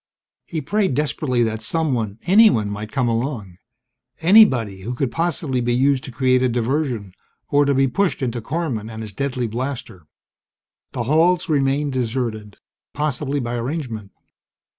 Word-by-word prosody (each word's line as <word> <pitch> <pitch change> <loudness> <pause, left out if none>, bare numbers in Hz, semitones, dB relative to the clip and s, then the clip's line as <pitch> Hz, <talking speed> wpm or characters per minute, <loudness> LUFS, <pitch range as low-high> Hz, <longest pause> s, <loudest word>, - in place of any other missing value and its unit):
He 160 -3 -3
prayed 190 0 0
desperately 135 -4 0
that 110 -1 -2
someone 120 -6 -1
anyone 180 - +5
might 105 +1 -6
come 125 +1 0
along. 115 -6 -3 0.6
Anybody 130 - +5
who 120 +6 -4
could 125 -1 -1
possibly 160 -6 -1
be 120 0 0
used 135 +1 +2
to 130 - -8
create 130 +1 +2
a 130 - +2
diversion, 120 -4 -1 0.4
or 145 0 +3
to 140 -1 +2
be 135 +1 +3
pushed 170 +2 0
into 120 -1 -2
Korman 125 -6 -3
and 110 0 -6
his 105 -2 -9
deadly 130 +1 -2
blaster. 115 - -5 0.9
The 120 - -2
halls 165 +7 +2
remained 140 -1 +1
deserted, 115 -4 -3 0.4
possibly 145 -1 -1
by 120 -2 -3
arrangement. 120 -5 -4
130 Hz, 145 wpm, -21 LUFS, 115-150 Hz, 0.9 s, anyone